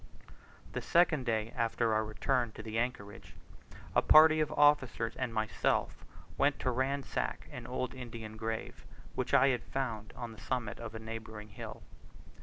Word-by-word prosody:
The - - -2
second 160 -6 +3
day 110 0 0
after 115 -1 +1
our 110 0 +2
return 120 +2 0
to - - -8
the 110 0 -2
anchorage, 115 -4 -4 0.6
a - - +5
party 155 0 +7
of 155 - +1
officers 130 -6 +3
and 130 -2 -2
myself 110 -1 0 0.4
went 140 0 +3
to 130 - +1
ransack 135 +2 -2
an - - -7
old 130 - -3
Indian 115 -4 -7
grave, 110 0 -4 0.3
which - - 0
I 135 +2 +6
had 125 -3 +1
found 115 -6 -4
on 120 -1 -6
the 110 -1 -12
summit 115 -1 -3
of 115 -1 -7
a - - -4
neighbouring 110 -1 -7
hill. 100 - -8
115 Hz, 160 wpm, -32 LUFS, 110-130 Hz, 0.6 s, party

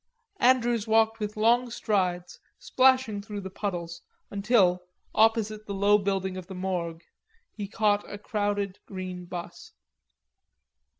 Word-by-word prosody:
Andrews 240 -3 +3
walked 225 0 +3
with 210 0 -4
long 240 +3 +3
strides, 185 -6 -1 0.2
splashing 255 -5 +3
through 205 -1 -6
the 190 -1 -7
puddles, 170 -4 -4 0.3
until, 200 -3 +3 0.3
opposite 215 -1 +2
the 200 - -4
low 205 +1 +4
building 190 -1 -2
of 185 -2 -8
the 190 - -8
Morgue, 175 -3 -3 0.5
he 205 -2 -6
caught 205 0 0
a 205 - -5
crowded 205 -2 -2
green 185 -2 -6
bus. 175 0 -8
205 Hz, 125 wpm, -27 LUFS, 185-220 Hz, 0.5 s, low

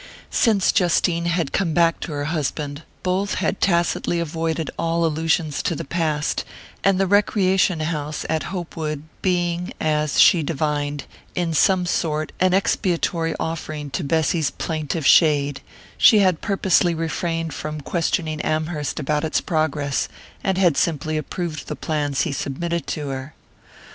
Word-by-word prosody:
Since 215 -5 +3
Justine 175 -2 +2
had 170 -4 0
come 175 -5 0
back 170 -1 +3
to - - -5
her 145 -1 -3
husband, 150 -1 -3 0.2
both 190 +2 0
had 200 - -1
tacitly 175 -1 +1
avoided 160 0 -2
all 165 0 0
allusions 160 -1 0
to 170 - -1
the - - -5
past, 155 -1 -1 0.4
and 195 -1 +3
the 195 - +3
recreation 190 -3 +2
house 150 -2 -3
at 160 0 0
Hopewood 160 -5 -4 0.2
being, 175 -1 0
as 150 -1 +1
she 170 - +7
divined, 145 -1 -2 0.3
in 175 -2 0
some 185 +2 +3
sort 155 -3 -1
an 185 0 +3
expiatory 170 -3 0
offering 155 -3 -4
to 135 - -2
Bessy's 160 +1 +1
plaintive 155 -1 -3
shade, 145 -3 +4 0.4
she 220 - +7
had 185 -5 +3
purposely 190 -4 +2
refrained 165 +1 -2
from 155 0 -5
questioning 155 0 -1
Amherst 155 -2 -2
about 150 +2 0
its 160 - +1
progress, 150 -3 -1 0.4
and 190 -1 0
had 175 -6 +3
simply 155 -2 0
approved 155 +1 -4
the - - -4
plans 145 -3 -1
he 165 - 0
submitted 170 +5 -3
to 150 -2 -3
her. 135 +2 -6
160 Hz, 145 wpm, -22 LUFS, 150-175 Hz, 0.4 s, she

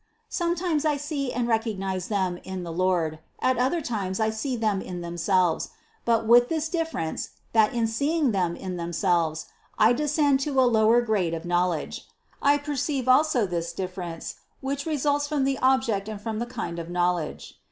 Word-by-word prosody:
Sometimes 345 -3 0
I 300 -2 +2
see 280 -2 -3
and 240 -1 -1
recognize 195 -5 -1
them 190 -4 -1
in 190 -1 -5
the 170 - -5
Lord, 170 -3 0 0.2
at 255 -1 +2
other 270 +7 +1
times 200 -8 -3
I 220 0 +2
see 235 +4 -2
them 215 -4 0
in 180 -1 -6
themselves; 175 +1 +1 0.4
but 230 -1 +2
with 240 +2 +6
this 320 -1 -1
difference 325 - -2 0.2
that 220 0 +4
in 230 -1 +2
seeing 280 +5 +1
them 180 -4 0
in 185 -1 -5
themselves, 170 -2 0 0.3
I 220 +3 +5
descend 290 0 +2
to 275 -1 0
a - - +6
lower 230 0 +4
grade 195 -8 0
of 165 +1 -7
knowledge. 175 -2 -1 0.3
I 285 +1 +4
perceive 285 -2 -2
also 255 -3 +4
this 170 -2 -3
difference, 180 -2 -5 0.2
which 280 +2 -3
results 290 -1 +1
from 290 -2 0
the 270 0 0
object 245 -6 +2
and 215 -2 -5
from 220 +1 -4
the 240 - -2
kind 215 -9 -5
of 165 0 -6
knowledge. 175 -2 -2
220 Hz, 175 wpm, -26 LUFS, 180-275 Hz, 0.4 s, with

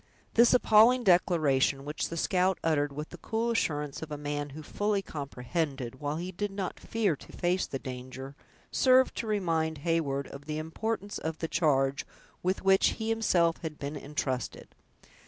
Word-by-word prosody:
This 235 +1 +6
appalling 240 +2 +6
declaration, 150 - +3
which 150 +1 -3
the 165 - -5
scout 185 +2 +2
uttered 145 -3 +1
with 150 +2 -6
the - - -11
cool 230 +1 -1
assurance 150 -10 -1
of 160 - -6
a 150 - -3
man 145 0 -3
who 155 - -7
fully 205 +4 -1
comprehended, 140 -3 -4
while 145 0 -2
he 180 +2 -4
did 205 +3 -3
not 195 -2 -4
fear 215 -8 0
to - - -14
face 180 +1 0
the 135 - -3
danger, 130 +1 -7 0.4
served 260 0 +4
to 230 - -3
remind 165 -6 0
Heyward 145 -5 0
of 140 +1 -10
the 155 0 -3
importance 200 +6 -3
of 160 0 -4
the 165 - -3
charge 140 -5 +2 0.4
with 185 +2 -1
which 195 0 +4
he 220 -1 -3
himself 180 -7 +2
had 155 -2 -6
been 145 +2 -5
intrusted. 140 -3 -4
160 Hz, 170 wpm, -29 LUFS, 145-195 Hz, 0.4 s, This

